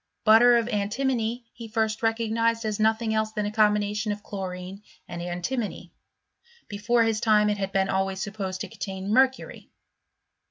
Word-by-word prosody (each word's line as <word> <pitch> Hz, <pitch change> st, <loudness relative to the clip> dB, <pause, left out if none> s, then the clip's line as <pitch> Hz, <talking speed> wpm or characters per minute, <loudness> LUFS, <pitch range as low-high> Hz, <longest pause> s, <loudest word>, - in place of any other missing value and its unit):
Butter 235 Hz, +2 st, +7 dB
of 230 Hz, -1 st, 0 dB
antimony 235 Hz, +2 st, -1 dB
he 230 Hz, -1 st, -9 dB
first 220 Hz, -1 st, -1 dB
recognised 230 Hz, 0 st, 0 dB
as 215 Hz, -1 st, -2 dB
nothing 220 Hz, +1 st, +1 dB
else 220 Hz, 0 st, -1 dB
than 210 Hz, -1 st, -2 dB
a 205 Hz, -, -2 dB
combination 210 Hz, 0 st, +1 dB
of 205 Hz, 0 st, -6 dB
chlorine 190 Hz, -1 st, -6 dB, 0.3 s
and 175 Hz, 0 st, -6 dB
antimony; 180 Hz, +7 st, -4 dB, 0.7 s
before 230 Hz, +3 st, +1 dB
his 225 Hz, -1 st, 0 dB
time 210 Hz, -2 st, +4 dB
it 205 Hz, -, -3 dB
had 195 Hz, -1 st, -2 dB
been 195 Hz, 0 st, +1 dB
always 190 Hz, 0 st, -1 dB
supposed 195 Hz, -2 st, -4 dB
to -, -, -4 dB
contain 195 Hz, +1 st, -5 dB
mercury. 260 Hz, +1 st, +1 dB
215 Hz, 155 wpm, -26 LUFS, 200-230 Hz, 0.7 s, Butter